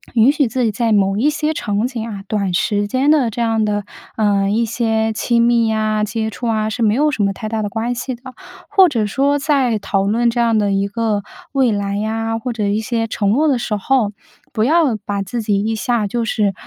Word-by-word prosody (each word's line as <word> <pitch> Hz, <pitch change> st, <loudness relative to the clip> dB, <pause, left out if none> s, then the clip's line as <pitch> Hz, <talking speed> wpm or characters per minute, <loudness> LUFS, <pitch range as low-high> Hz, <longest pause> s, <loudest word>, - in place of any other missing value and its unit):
允 235 Hz, +4 st, +6 dB
许 290 Hz, -2 st, +1 dB
自 250 Hz, +3 st, -1 dB
己 225 Hz, -, +1 dB
在 230 Hz, +2 st, -1 dB
某 195 Hz, -2 st, +2 dB
一 245 Hz, +9 st, +2 dB
些 305 Hz, 0 st, -1 dB
场 205 Hz, -6 st, -1 dB
景 245 Hz, -3 st, -4 dB
啊， 200 Hz, -3 st, -7 dB
短 200 Hz, -4 st, -1 dB
时 205 Hz, +3 st, 0 dB
间 260 Hz, +7 st, +2 dB
的 280 Hz, -6 st, +3 dB
这 225 Hz, -, -7 dB
样 225 Hz, -2 st, +1 dB
的， 205 Hz, -1 st, -1 dB, 0.3 s
呃， 200 Hz, -2 st, +2 dB
一 225 Hz, +3 st, +1 dB
些 225 Hz, -1 st, 0 dB
亲 235 Hz, +2 st, +1 dB
密 235 Hz, -2 st, +3 dB
啊、 215 Hz, -1 st, 0 dB
接 220 Hz, +1 st, -2 dB
触 240 Hz, +3 st, -5 dB
啊， 215 Hz, -1 st, 0 dB
是 235 Hz, -, -4 dB
没 215 Hz, -1 st, +3 dB
有 300 Hz, +3 st, +2 dB
什 240 Hz, -, -2 dB
么 200 Hz, -, +2 dB
太 215 Hz, -, -6 dB
大 220 Hz, 0 st, -2 dB
的 205 Hz, -, -2 dB
关 230 Hz, +3 st, -2 dB
系 245 Hz, +1 st, -4 dB
的。 240 Hz, -, -23 dB, 0.4 s
或 380 Hz, -2 st, +5 dB
者 230 Hz, -7 st, 0 dB
说 275 Hz, +7 st, +1 dB
在 275 Hz, -5 st, +1 dB
讨 200 Hz, -1 st, -1 dB
论 235 Hz, +3 st, +2 dB
这 240 Hz, 0 st, 0 dB
样 230 Hz, -1 st, +2 dB
的 205 Hz, -1 st, +1 dB
一 195 Hz, 0 st, +1 dB
个 220 Hz, -1 st, -1 dB, 0.3 s
未 265 Hz, -4 st, +2 dB
来 200 Hz, -1 st, -2 dB
呀， 225 Hz, +1 st, -2 dB
或 250 Hz, +2 st, -3 dB
者 220 Hz, -3 st, -2 dB
一 200 Hz, +1 st, 0 dB
些 225 Hz, 0 st, -1 dB
承 210 Hz, -2 st, -1 dB
诺 285 Hz, +9 st, +3 dB
的 270 Hz, -5 st, +2 dB
时 230 Hz, -2 st, -2 dB
候， 215 Hz, 0 st, +1 dB, 0.4 s
不 220 Hz, -2 st, 0 dB
要 295 Hz, -3 st, +3 dB
把 200 Hz, -1 st, -2 dB
自 215 Hz, +5 st, -4 dB
己 205 Hz, -2 st, +1 dB
一 220 Hz, +1 st, -1 dB
下 220 Hz, +1 st, 0 dB
就 235 Hz, +3 st, -2 dB
是， 210 Hz, -3 st, 0 dB
225 Hz, 250 characters per minute, -18 LUFS, 210-240 Hz, 0.4 s, 允